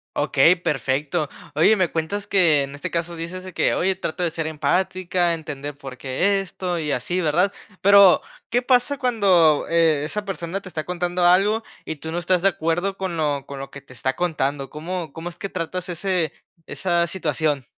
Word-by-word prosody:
Okey, 165 +7 +4
perfecto. 145 -2 -1 0.3
Oye, 205 +8 +5
me 185 -3 +2
cuentas 200 +6 -3
que 165 -8 +4
en 140 +1 -7
este 145 - -5
caso 170 0 -2
dices 175 +3 -6
de 185 - -9
que: - - +2
"Oye, 190 +1 +1
trato 180 -1 -3
de 170 - 0
ser 160 -1 -3
empática, 175 +3 0
entender 145 -3 -6
por 135 -2 -9
qué 180 +11 +1
esto 180 -2 -4
y 150 -2 -2
así", 175 +8 -1
¿verdad? 175 +6 +2 0.3
Pero, 200 -1 +7 0.3
¿qué 245 +2 +2
pasa 250 +2 +2
cuando, 195 - +3
eh, 165 -3 +3
esa 205 +7 -3
persona 190 -1 -4
te 195 - -13
está 155 -4 -4
contando 180 0 -2
algo, 200 +5 +4 0.2
y 160 - -4
tú 160 +2 -7
no 170 - -3
estás 175 +1 +1
de 195 - +5
acuerdo 175 +2 -1
con 185 -3 -3
lo 145 -3 -1
con 140 -1 -8
lo 135 - -7
que 140 - -9
te 130 -1 -17
está 130 +1 -2
contando? 145 -5 -1
¿Cómo 165 0 -5
cómo 165 +2 -6
es 175 - -14
que - - -4
tratas 180 0 -4
ese 175 -2 -1 0.3
esa 175 -2 0
situación? 155 -5 -1
170 Hz, 190 wpm, -22 LUFS, 150-185 Hz, 0.3 s, Pero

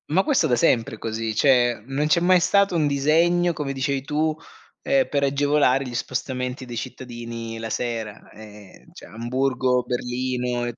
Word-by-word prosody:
Ma 185 +6 +3
questo 265 - +2
da 125 - +2
sempre 115 -1 +2
è - - -15
così, 110 0 -3
cioè 120 -3 +3
non 135 +3 -1
c'è 170 +3 +3
mai 180 +1 +4
stato 195 +1 +3
un 160 -3 +2
disegno, 165 +5 +2
come 150 -3 -4
dicevi 135 0 -1
tu, 155 +3 -1 0.5
ehm, 270 -1 +2
per 140 -1 0
agevolare 140 -1 +2
gli 125 - -7
spostamenti 125 +1 -3
dei 120 -1 -8
cittadini 115 -2 -7
la 115 0 -5
sera. 110 -3 -4
Ehm, 105 -2 -14
cioè, - - -12
Amburgo, 125 +2 0
Berlino, 125 0 -2
130 Hz, 160 wpm, -23 LUFS, 120-150 Hz, 0.5 s, mai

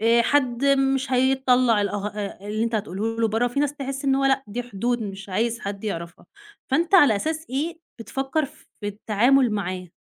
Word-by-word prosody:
آآ 230 +2 +4
حد 255 -1 +1
مش 270 -1 +2
هيطّلع 255 -3 +3
الأه 205 0 -2
آآ 210 -1 -6
اللي 215 +2 -1
أنتَ 230 0 -2
هتقوله 215 +2 -2
له 225 - +3
برّا، 225 +3 +1
وفي 245 +4 -1
ناس 290 0 0
تحس 275 0 -5
إن 270 -1 +3
هو 275 0 +1
لأ، 270 0 +2
دي 235 +4 -4
حدود 240 +1 -2
مش 195 -1 -7
عايز 230 +5 0
حد 200 0 -5
يعرفها. 170 -4 -5 0.4
فأنت 335 +7 +2
على 290 - +7
أساس 315 +8 -3
إيه 315 +6 -2 0.2
بتفكّر 270 +6 -2
ف 275 - -14
في 205 - -3
التعامل 230 +5 +2
معاه؟ 185 -3 -3
240 Hz, 190 wpm, -24 LUFS, 210-270 Hz, 0.4 s, على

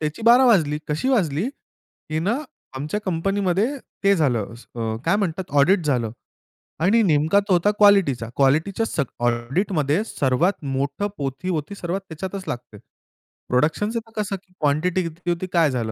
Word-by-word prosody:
त्याची 155 +7 -3
बारा 240 +3 +7
वाजली. 155 -10 +3
कशी 155 - -1
वाजली 185 - +1
की 155 - -10
ना, 205 +9 0 0.4
आमच्या 155 +10 -3
कंपनीमध्ये 190 +2 0 0.4
ते 200 0 +5
झालं, 120 - 0
असं 115 -1 -5
अ, - - -4
काय 200 - +3
म्हणतात 190 -4 -2
ऑडिट 180 +5 +4
झालं 125 -7 0 0.7
आणि 225 +5 +4
नेमका 160 +3 +3
तो 190 - +3
होता 180 +4 +3
क्वालिटीचा. 195 - +4
क्वालिटीच्या 160 +11 +2
सग 150 -9 -1 0.2
ऑडिटमध्ये 145 - 0
सर्वात 160 - 0
मोठं 140 +8 -2
पोथी 135 +5 -4
होती, 165 +2 -3
सर्वात 185 +1 -3
त्याच्यातच 190 +4 -5
लागते. 120 -3 -6 0.7
प्रोडक्शन 155 +11 +1 0.3
कसं 205 -2 -2
की 185 -1 -15
क्वांटिटी 155 +5 +1
किती 170 +2 -6
होती 175 +2 -1
काय 165 -4 +4
झालं? 115 -3 -2
165 Hz, 150 wpm, -22 LUFS, 140-195 Hz, 0.7 s, बारा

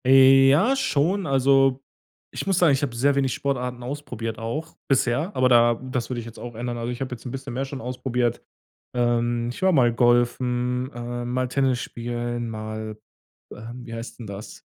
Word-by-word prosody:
Ja, 135 - +6
schon. 185 - +1
Also, 135 -1 +4 0.5
ich - - -5
muss 195 -3 +2
sagen, 175 -6 +5
ich 135 - 0
habe 130 -5 -2
sehr 140 +4 +3
wenig 135 -2 +1
Sportarten 125 -3 -2
ausprobiert 120 -4 -5
auch 150 +9 -4
bisher, 135 +6 +1
aber 130 0 +4
da 120 -1 +5
das 125 0 -4
würde 125 -2 -3
ich 115 - -7
jetzt 115 -1 -10
auch 120 -1 -8
ändern. 120 +1 -4
Also, 120 +1 -3
ich 125 - -6
habe 130 -1 -3
jetzt 120 - -10
'n 125 - -5
bisschen 135 -1 -6
mehr 135 +3 -2
schon 135 0 -7
ausprobiert. 125 -1 -1 0.5
Ähm, 120 -1 +1
ich 125 - -9
war 190 0 +4
mal 125 -7 +4
golfen, 125 +1 +1
äh, 120 0 -5
mal 125 +1 -1
Tennis 130 -1 +1
spielen, 120 0 -4
mal 110 0 -6 0.6
ähm, 120 +2 -9
wie 115 - -8
heißt 115 +2 -7
'n 120 - -7
das? 100 +1 -9
125 Hz, 185 wpm, -24 LUFS, 120-135 Hz, 0.6 s, Ja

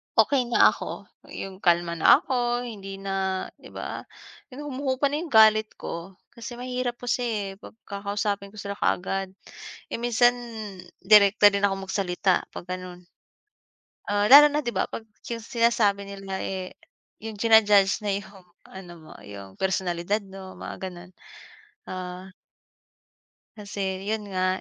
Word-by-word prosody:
okey 245 +2 +3
na 240 - +5
ako, - - -7 0.2
'yong 190 -1 -8
kalma 170 -2 +2
na 255 - +6
ako, 245 -1 -1
hindi 200 -5 -7
na 190 -1 -2 0.2
'di - - -13
ba, - - -6 0.5
yung 290 - -7
humuhupa 270 +1 0
na 295 - -1
'yung 340 - -5
galit 215 0 +6
ko. 170 +3 -7 0.2
Kasi 240 +1 -8
mahirap 250 0 -3
kasi 225 -6 -2
'pag - - -12
kakausapin 200 0 -3
ko - - -14
sila 200 0 -5
kaagad. 190 +1 -1 0.6
Eh, - - -2
minsan 240 +1 +3 0.6
direkta 205 +1 +6
din 200 0 -1
ako 195 -1 0
magsalita 185 -1 0
'pag 180 - -9
ganon. 180 -1 -7 1.1
Ah, 205 +3 +1
lalo 295 +1 +11
na 295 +1 -1
'di 240 - -2
ba - - -1
'pag 225 - -7 0.2
'yung 230 -2 -5
sinasabi 220 -4 +1
nila, 195 -1 -6
eh, 185 -1 -4 0.5
'yung 220 -1 -7
jina-judge 205 -3 +5
na 205 -2 -1
'yung 200 0 -8 0.2
ano 180 -2 -11
mo, 155 - -14
'yung 100 -2 -11
personalidad 190 +1 -1
mo, 190 -1 -11
mga - - -7
ganon. 180 0 -11 0.8
Ah 185 0 -6 1.3
Kasi 205 -1 -6 0.2
'yun 215 0 -2
nga, 185 0 0
200 Hz, 140 wpm, -25 LUFS, 190-230 Hz, 1.3 s, lalo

